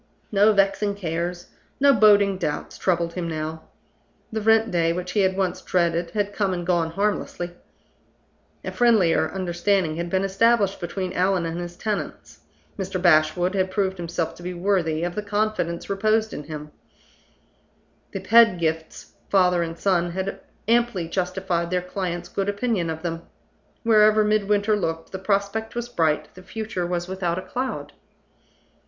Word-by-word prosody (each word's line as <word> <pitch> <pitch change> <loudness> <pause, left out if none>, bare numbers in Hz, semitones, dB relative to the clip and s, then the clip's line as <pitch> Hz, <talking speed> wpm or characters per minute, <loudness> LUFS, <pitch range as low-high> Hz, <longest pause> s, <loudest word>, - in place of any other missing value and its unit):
No 210 +1 +5
vexing 200 0 +2
cares, 175 -1 -4 0.3
no 280 0 +6
boding 205 -4 +5
doubts, 150 -4 -3
troubled 170 -2 0
him 175 -1 -3
now. 160 0 -4 0.7
The 220 0 -2
rent 225 +1 +3
day, 165 -1 +2
which 180 +1 -4
he 205 - 0
had 190 -1 +2
once 190 -2 -1
dreaded, 170 -1 0
had 205 -1 0
come 195 -3 0
and 175 -1 -4
gone 170 -2 +1
harmlessly. 190 -2 -2 1.1
A - - -3
friendlier 190 -10 +3
understanding 180 -2 0
had 170 0 -3
been 190 +2 +1
established 200 +1 +2
between 180 +1 -3
Allan 185 -1 +1
and 165 +1 -3
his 175 0 -7
tenants; 210 0 -4 0.4
Mr. 190 -1 -3
Bashwood 175 +1 +3
had 190 -1 +1
proved 190 0 -1
himself 170 -1 -3
to - - -14
be 180 +1 -5
worthy 175 -4 0
of 175 0 -2
the 210 - -3
confidence 205 -4 -1
reposed 215 +2 +1
in 150 - -6
him; 150 -1 -7 1.4
the - - -5
Pedgifts, 170 -9 +2 0.2
father 180 -3 +3
and 165 0 -4
son, 175 -3 +1
had 190 +1 -3 0.3
amply 230 -7 +2
justified 180 -1 -1
their 180 0 0
client's 180 -2 -4
good 195 0 -2
opinion 205 -4 -1
of 160 +1 -5
them. 165 -1 -3 0.6
Wherever 215 -1 +5
Midwinter 210 0 +2
looked, 165 -5 -3
the 190 - -5
prospect 200 +3 -1
was 240 0 -3
bright, 155 -7 0
the 185 - -13
future 185 -2 -4
was 175 0 -2
without 185 -2 -2
a 185 - -4
cloud. 255 +1 -4
185 Hz, 155 wpm, -24 LUFS, 170-205 Hz, 1.4 s, no